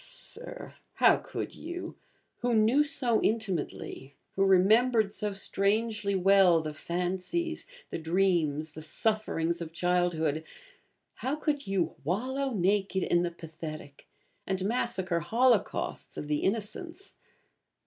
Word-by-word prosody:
Ah, - - -3
Sir, - - -6 0.2
how - - +6
could - - -5
you 345 +3 -6 0.4
who 245 -1 0
knew 225 +7 +5
so 250 -6 +1
intimately, 185 - -2 0.2
who 195 - +2
remembered 210 +3 +4
so 210 -1 -2
strangely 200 +1 0
well 190 -2 +5
the 155 -1 -4
fancies, 185 - -2 0.2
the - - -3
dreams, 160 -3 +1
the 155 - -9
sufferings 170 -1 -1
of 165 -1 -5
childhood 170 -3 +1 0.7
how 265 +3 -1
could 295 -2 -2
you 195 -3 0
'wallow 260 - -1
naked 195 -1 +1
in 175 - +2
the 175 - 0
pathetic,' 160 -3 -9 0.4
and 190 0 -1
massacre 195 -6 0
holocausts 230 +4 +1
of 150 - -5
the 150 0 0
Innocents? 230 - -3
195 Hz, 120 wpm, -29 LUFS, 170-230 Hz, 0.7 s, how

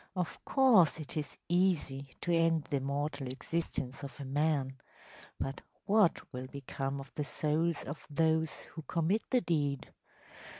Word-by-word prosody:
Of 180 -3 -3
course 225 - +5
it 155 - -5
is 150 -2 -3
easy 160 -7 +1
to 175 - 0
end 165 -2 +3
the 140 - -1
mortal 140 +1 -2
existence 135 -1 -3
of 140 -1 -8
a 140 - -5
man, 135 -1 0 0.6
but 135 +1 -3 0.2
what 205 -4 +4
will 130 0 -5
become 135 0 -4
of 135 0 -10
the 150 - -2
souls 155 +3 0
of 145 +3 -7
those 160 +1 +2 0.2
who 160 - -6
commit 170 +7 +1
the 250 -2 +3
deed? 145 -7 -1
150 Hz, 145 wpm, -33 LUFS, 140-170 Hz, 0.6 s, course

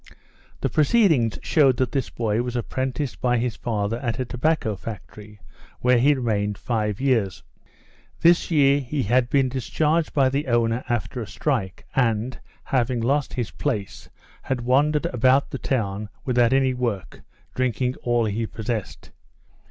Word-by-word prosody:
The - - +1
proceedings 155 - +3
showed 135 -6 +3
that 130 -2 0
this 135 -3 -1
boy 115 -1 -1
was 125 0 -4
apprenticed 130 +3 -3
by 125 -1 +2
his 120 -1 -1
father 110 -1 -2
at 120 -3 -2
a 130 - -2
tobacco 125 -3 0
factory, 105 +1 -10 0.4
where 125 -1 +4
he 145 +4 +4
remained 105 -5 -1
five 105 -3 -2
years. 115 -9 0 0.8
This 170 0 +4
year 140 -3 +4
he 135 +1 -2
had 120 +3 +2
been 135 -1 +3
discharged 150 +5 0
by 135 -3 +3
the 140 +2 -2
owner 120 0 +1
after 120 +1 -2
a 110 - -6
strike, 105 -4 -2
and, 115 -1 0 0.2
having 125 -2 0
lost 135 +5 0
his 120 -4 -3
place, 110 -9 -4 0.4
he 135 - +2
wandered 135 +5 +2
about 130 +3 +2
the 135 - -4
town 105 -5 -2 0.2
without 120 -2 +3
any 135 -1 +3
work, 120 -7 -3 0.3
drinking 125 0 0
all 120 -1 +1
he 110 +2 -2
possessed. 110 -1 -5
125 Hz, 150 wpm, -23 LUFS, 115-135 Hz, 0.8 s, where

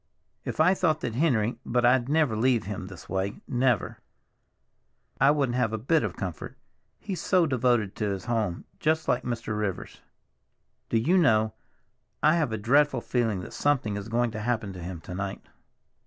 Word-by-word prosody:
If - - -5
I 170 +4 +5
thought 160 -5 +1
that 120 - -3
Henry—but 120 -3 +1
I'd 125 +1 +3
never 150 -6 +2
leave 120 +1 +2
him 95 -1 -5
this 95 -2 -11
way, 95 +2 -2
never; 125 -4 0 1.2
I 135 - +5
wouldn't 140 -4 +1
have 120 -3 +1
a - - 0
bit 135 +9 +2
of 105 -5 -3
comfort. 90 -5 -6 0.4
He's 195 -4 -5
so 180 -3 +3
devoted 120 -7 +1
to 105 - -1
his 95 -1 -4
home, 110 -8 -1
just 160 +1 +1
like 125 - +2
Mr. 115 -3 -3
Rivers." 105 -3 -4 0.9
"Do 115 - +2
you 170 +12 +3
know—I 110 +3 0
have 160 -7 +1
a 110 - -1
dreadful 140 +8 +3
feeling 115 -6 0
that - - -9
something 135 -8 0
is 100 +1 -6
going 120 0 +1
to 110 - -5
happen 110 -3 -2
to 90 - -9
him 85 -1 -6
to 90 - -8
night?" 95 +1 -4
120 Hz, 170 wpm, -27 LUFS, 105-140 Hz, 1.2 s, I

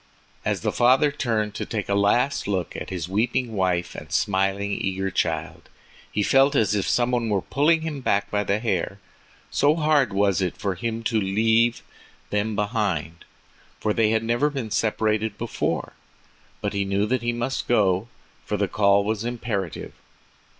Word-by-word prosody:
As - - -1
the - - 0
father 130 +4 +4
turned 110 -7 -1
to - - -4
take 110 -4 -4
a 100 - 0
last 110 +8 +2
look 95 -4 -2
at - - -6
his 90 -3 -4
weeping 115 +4 0
wife 90 -3 0
and - - -9
smiling, 95 +1 0
eager 95 -1 -2
child, 80 -3 -2 0.4
he 105 - 0
felt 135 +5 +4
as 110 -4 +3
if 100 -4 0
some 120 0 +2
one 120 -2 0
were 100 -3 0
pulling 160 +4 +2
him 155 -4 -4
back 100 -5 0
by 105 0 +1
the 100 0 +1
hair, 100 -4 -1 0.5
so 145 +2 +3
hard 150 -7 +2
was 100 -1 +2
it 90 -2 -2
for 100 -2 -1
him 115 +4 -4
to 110 -1 +1
leave 110 +4 +2 0.5
them 105 +1 0
behind, 100 -7 -2 0.5
for 105 - 0
they 110 -1 +2
had 110 0 +1
never 120 +6 +1
been 135 -7 -5
separated 110 -1 0
before. - - -2 0.7
But - - -2
he 100 0 0
knew 100 +1 0
that 125 +2 0
he 120 0 0
must 120 +3 -3
go, 100 -3 +2 0.4
for 105 - -2
the 100 0 +1
call 100 0 +3
was 110 +1 -2
imperative. 115 -7 -4
105 Hz, 170 wpm, -24 LUFS, 100-120 Hz, 0.7 s, father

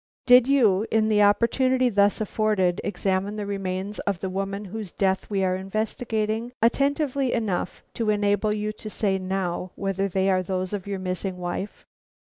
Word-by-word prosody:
"Did 250 0 +7
you, 225 -7 +3
in 220 0 +2
the 210 -1 +4
opportunity 250 +5 +3
thus 205 -3 +3
afforded, 210 -4 +1
examine 200 0 -1
the 210 -1 -4
remains 195 0 -3
of 200 -4 -2
the 190 +1 -4
woman 195 +2 -3
whose 205 -1 -6
death 190 -1 0
we 195 -2 0
are 185 -1 +1
investigating, 220 +3 -2
attentively 275 +2 +1
enough 205 -6 -2
to 225 -2 -1
enable 205 0 +2
you 210 0 -1
to 215 0 -9
say 195 -2 0
now 185 -1 -2
whether 195 0 -1
they 190 0 0
are 185 0 +2
those 185 +1 -3
of 200 -1 -4
your 200 -1 -2
missing 185 0 -3
wife?" 180 +3 -5
205 Hz, 165 wpm, -25 LUFS, 190-220 Hz, -, Did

